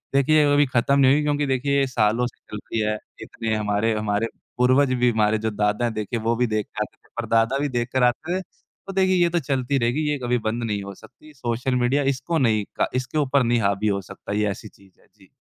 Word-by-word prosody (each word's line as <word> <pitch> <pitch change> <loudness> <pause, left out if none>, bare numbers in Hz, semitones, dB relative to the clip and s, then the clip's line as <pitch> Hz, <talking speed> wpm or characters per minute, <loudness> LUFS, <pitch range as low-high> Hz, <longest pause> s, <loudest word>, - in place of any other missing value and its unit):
देखिए 150 +2 +4
अभी 145 0 +5
ख़त्म 130 +2 +1
नहीं 135 -1 +6
हुई 150 - +2
क्योंकि 145 0 0
देखिए 140 +2 +1
ये 135 - +2
सालों 115 0 +1
से 120 - -14
चल 105 - -4
रही 110 +2 -4
है। 105 0 0 0.2
इतने 110 -1 -4
हमारे 105 +1 0
हमारे 105 +1 -1 0.3
पूर्वज 130 +2 +3
भी, 125 -1 +3
हमारे 110 -1 +2
जो 110 +1 -2
दादा 105 +2 0
हैं 115 - -1
देखिए 110 +2 -3
वो 115 +1 0
भी 125 +1 +1
देख 110 -1 -1
के 105 - -7
आते - - -12
थे, - - -30
परदादा 115 +3 +1
भी 145 - -1
देख 120 0 -1
कर 130 -1 +2
आते 160 +9 +1
थे। - - -5 0.5
तो 195 - -5
देखिए 185 -1 +3
ये 170 - +3
तो 175 - +3
चलती 135 -2 -1
रहेगी, 120 +5 0
ये 145 - 0
कभी 125 0 +1
बंद 115 +1 -2
नहीं 105 -3 -2
हो 100 0 -7
सकती, 155 +9 -17
सोशल 125 -1 -2
मीडिया 125 +3 +2
इसको 150 +6 -2
नहीं 110 -6 +2
का - - +1
इसके 130 +4 -2
ऊपर 140 -2 +2
नहीं 120 0 +2
हावी 100 +1 0
हो 100 -1 0
सकता, 95 - -8
ये 105 0 +1
ऐसी 110 - -8
चीज़ 100 -2 -22
है। - - -27
जी। 95 -2 -22
120 Hz, 245 wpm, -23 LUFS, 110-135 Hz, 0.5 s, नहीं